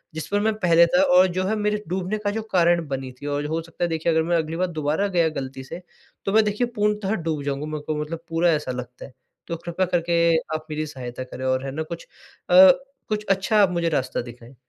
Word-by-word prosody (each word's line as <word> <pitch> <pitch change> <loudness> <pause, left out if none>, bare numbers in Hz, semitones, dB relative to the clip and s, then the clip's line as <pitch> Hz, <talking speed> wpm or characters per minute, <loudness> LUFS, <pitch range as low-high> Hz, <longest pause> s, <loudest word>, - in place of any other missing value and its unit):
जिस 160 0 -5
पर 205 - 0
मैं 220 +1 +1
पहले 170 -3 +5
था 270 - +3 0.2
और 185 - +7
जो 185 - +1
है 220 - 0
मेरे 210 0 -1
डूबने 185 +4 -2
का 205 - +1
जो 225 - -3
कारण 170 -2 +3
बनी 135 -2 -4
थी। - - -7
और 145 0 -2
हो 160 +2 -2
सकता 165 +1 -6
है 175 - +1
देखिए 165 +1 0
अगर 160 0 +2
मैं 170 +1 +1
अगली 160 0 -2
बार 185 +1 +1
दोबारा 155 +7 0
गया 165 -1 +4
गलती 130 0 -7
से, 170 +7 -8 0.4
तो 195 - -1
मैं 220 0 +6
देखिए 210 +4 0
पूर्णतः 210 -1 0
डूब 160 -6 -3
जाऊँगा 140 +1 -3
मेरे 155 -1 -5
को 155 - -1
मतलब 165 +2 -6
पूरा 165 +1 +2
ऐसा 150 -4 -2
लगता 125 0 -7
है। 135 - -15 0.3
तो 170 - -3
कृपया 170 +3 -2
करके 170 -1 +2 0.2
आप 155 - -5
मेरी 155 0 -2
सहायता 130 -2 -7
करें 130 0 -7
और 130 +1 0
है 135 - -4
ना, 155 +4 -3
कुछ 170 +2 -8 0.4
अ, 185 +1 +9 0.4
कुछ 210 -1 -2
अच्छा 195 +3 +2
आप 195 - +4
मुझे 170 -1 0
रास्ता 130 -4 -1
दिखाएँ। 120 +1 -12
165 Hz, 240 wpm, -23 LUFS, 145-185 Hz, 0.4 s, अ